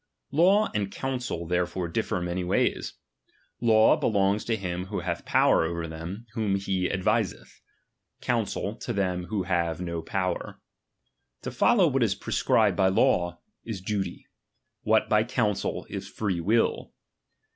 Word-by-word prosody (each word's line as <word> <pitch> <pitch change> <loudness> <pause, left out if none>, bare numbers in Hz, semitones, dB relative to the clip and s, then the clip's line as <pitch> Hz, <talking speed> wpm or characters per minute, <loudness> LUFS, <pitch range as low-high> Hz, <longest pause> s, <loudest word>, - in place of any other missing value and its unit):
Law 190 +9 +4
and 100 -3 -1
counsel 125 -10 -3
therefore 90 +1 -1
differ 85 +2 -1
many 90 +1 -2
ways. 90 - 0 0.7
Law 110 -2 +5
belongs 100 -1 +1
to 115 - 0
him 90 -3 -4
who 100 -2 -3
hath 85 -1 -3
power - - +4
over 85 0 -3
them 85 +8 -7
whom 105 -3 0
he 95 -2 -1
adviseth; 95 -2 -1 0.6
counsel 110 -3 -1
to 120 - -4
them 90 -3 -1
who 100 0 -2
have 85 -3 0
uo 85 -2 -4
power. 95 -2 -3 0.8
To - - -4
follow - - +4
what - - +1
is - - +2
prescribed - - +2
by 95 -1 +3
law, 90 -2 +2 0.2
is 110 -4 -5
duty; 95 +1 -3 0.6
what - - +2
by 105 0 +3
counsel, 115 -4 -1
is - - -6
free 95 -5 -2
will. 110 +7 +1
95 Hz, 140 wpm, -27 LUFS, 90-110 Hz, 0.8 s, Law